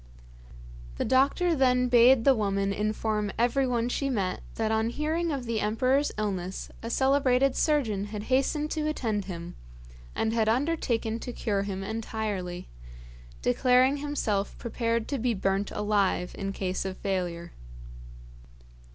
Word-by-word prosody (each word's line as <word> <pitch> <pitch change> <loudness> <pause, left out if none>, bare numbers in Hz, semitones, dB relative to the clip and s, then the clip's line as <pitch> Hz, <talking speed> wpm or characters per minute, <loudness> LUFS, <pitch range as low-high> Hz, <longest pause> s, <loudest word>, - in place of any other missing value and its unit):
The - - -1
doctor 280 +7 +3
then 250 -3 +3
bade 245 0 +6
the 275 - +6
woman 200 -3 0
inform 210 0 -1
everyone 245 0 +1
she 275 +3 -1
met 195 -7 -1
that 220 -1 -1
on 220 +1 +1
hearing 315 +6 -1
of 270 -4 -3
the 230 -2 -1
emperor's 255 +7 +1
illness 190 -3 -3
a 230 - -5
celebrated 265 0 +3
surgeon 230 -11 +1
had 210 0 -6
hastened 275 +5 0
to 310 -1 -1
attend 220 -9 -1
him, 170 -3 -7 0.6
and 225 0 0
had 220 -1 +2
undertaken 235 -4 0
to 245 - -6
cure 205 -4 -1
him 195 -1 -4
entirely; 205 -4 -4 0.8
declaring 255 - +3
himself 270 -9 -2
prepared 230 -1 -2
to 280 - -1
be 240 0 0
burnt 195 +1 0
alive 205 -4 0
in 195 -1 -3
case 190 -1 -2
of 190 -1 -5
failure. 175 -3 -3
225 Hz, 135 wpm, -28 LUFS, 200-260 Hz, 0.8 s, bade